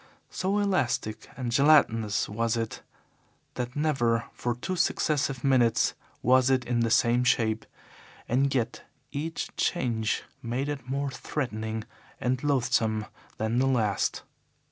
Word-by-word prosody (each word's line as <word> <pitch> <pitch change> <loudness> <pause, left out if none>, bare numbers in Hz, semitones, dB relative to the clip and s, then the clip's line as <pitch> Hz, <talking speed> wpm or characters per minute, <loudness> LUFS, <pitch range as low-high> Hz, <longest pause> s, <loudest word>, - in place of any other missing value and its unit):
So 195 +2 0
elastic 155 - 0
and 125 -3 -3
gelatinous 120 -6 +4
was 115 +2 -1
it 115 -1 -3 0.7
that 125 0 -4
never 120 -7 +1
for 120 -1 -2
two 185 +10 -3
successive 145 -5 0
minutes 125 -4 +3 0.3
was 130 +1 +5
it 130 -2 +2
the 120 -1 +1
same 120 +2 +3
shape, 115 -3 +1 0.6
and 135 +3 +2
yet 120 -2 -1 0.3
each 160 +3 -4
change 115 - 0 0.2
made 125 +5 -2
it 140 -3 -5
more 140 +1 -1
threatening 110 -6 -3 0.4
and 125 +1 -1
loathsome 115 -6 +1 0.3
than 110 +2 0
the 135 - +3
last. 110 -6 +1
125 Hz, 120 wpm, -28 LUFS, 115-140 Hz, 0.7 s, was